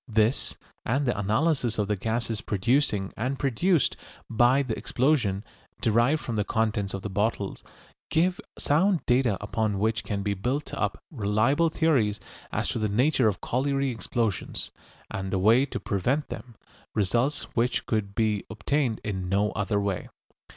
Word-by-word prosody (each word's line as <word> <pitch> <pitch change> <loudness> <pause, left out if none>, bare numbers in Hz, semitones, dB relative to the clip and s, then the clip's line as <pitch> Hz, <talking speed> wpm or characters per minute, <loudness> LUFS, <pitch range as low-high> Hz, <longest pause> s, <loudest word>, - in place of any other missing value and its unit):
This 110 +2 +1 0.3
and 135 +4 0
the 120 - +1
analysis 115 +4 +1
of 105 -2 0
the 105 - +1
gases 115 +2 -2
producing 105 -1 +1
and 135 +2 -2
produced 145 - +2 0.4
by 120 +5 +4
the 115 -5 -2
explosion, 120 -3 +1 0.4
derived 120 +7 +3
from 115 -3 -3
the 105 - +2
contents 105 -2 0
of 95 - -6
the 100 - -3
bottles, 105 0 -1 0.5
give 180 +3 +2 0.2
sound 170 +4 +2
data 125 -5 +3
upon 105 0 -1
which 110 +3 0
can 100 -2 -3
be 100 0 0
built 125 +9 -2
up 105 - -2
reliable 120 +6 +2
theories 135 -11 +2 0.3
as - - -1
to - - -2
the 110 -1 0
nature 125 +3 +3
of 105 - -1
colliery 135 +1 0
explosions 115 -3 -2 0.4
and 95 0 -3
the 95 - 0
way 115 +8 +4
to - - -4
prevent 125 +10 -1
them, 120 -2 -8 0.4
results 120 +8 +1
which 120 +1 +1
could 100 -3 -1
be 110 -3 +1
obtained 115 +2 0
in 95 -3 -3
no 100 +2 +2
other 105 +1 0
way. 100 -3 -2
115 Hz, 155 wpm, -27 LUFS, 105-135 Hz, 0.5 s, by